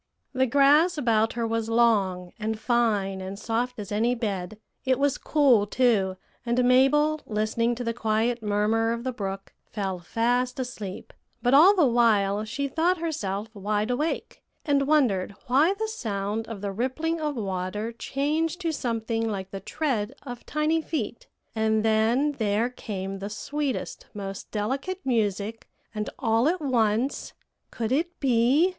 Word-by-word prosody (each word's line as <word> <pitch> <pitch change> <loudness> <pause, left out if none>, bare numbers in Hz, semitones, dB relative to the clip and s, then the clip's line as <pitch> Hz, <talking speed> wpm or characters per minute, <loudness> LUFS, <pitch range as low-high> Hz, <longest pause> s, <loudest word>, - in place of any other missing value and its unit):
"The 260 0 +2
grass 290 +7 +4
about 225 -5 +2
her 235 -1 -1
was 225 0 -1
long, 200 -6 +2
and 220 0 -2
fine, 210 -5 +1
and 190 +1 -6
soft 235 +4 -2
as 205 -2 -7
any 230 +4 +1
bed; 205 -4 -3 0.3
it 260 -1 +2
was 280 0 +1
cool 260 -9 +3
too, 205 -6 +2 0.3
and 245 +1 +1
Mabel, 290 +5 +4
listening 220 +2 0
to 245 - -5
the 230 -1 -1
quiet 225 +1 0
murmur 215 +2 +1
of 235 0 -5
the 260 - -1
brook, 195 -4 -5 0.2
fell 195 -4 -3
fast 245 +7 0
asleep; 215 -7 -6 0.3
but 245 +1 +3
all 345 +9 +8
the 345 -6 +4
while 215 -4 +3
she 280 +6 -2
thought 340 +6 +1
herself 220 - -3
wide 210 +2 -1
awake, 300 +6 -2 0.2
and 280 -2 +2
wondered 215 -11 +2
why 295 +10 +3
the 440 +2 -2
sound 220 - -3
of 225 -4 -7
the 200 -1 -2
rippling 290 +10 -2
of 300 -2 -1
water 200 +1 -3
changed 300 +8 -1
to 335 -2 0
something 225 -4 -2
like 195 -2 -4
the 195 - -5
tread 235 +1 -2
of 245 -3 -8
tiny 305 +2 +1
feet; 235 -8 -4 0.3
and 220 0 +1
then 225 +6 +3
there 220 +3 +1
came 195 -5 -5
the 200 +1 -5
sweetest, 280 +5 -4
most 195 -1 -6
delicate 275 - -3
music; 220 -3 -1 0.2
and 210 -1 -3
all 230 0 +2
at 360 +3 +1
once 245 -2 0 0.4
could 230 -1 -3
it 335 +6 -1
be? 265 +6 +3
230 Hz, 155 wpm, -26 LUFS, 210-275 Hz, 0.4 s, all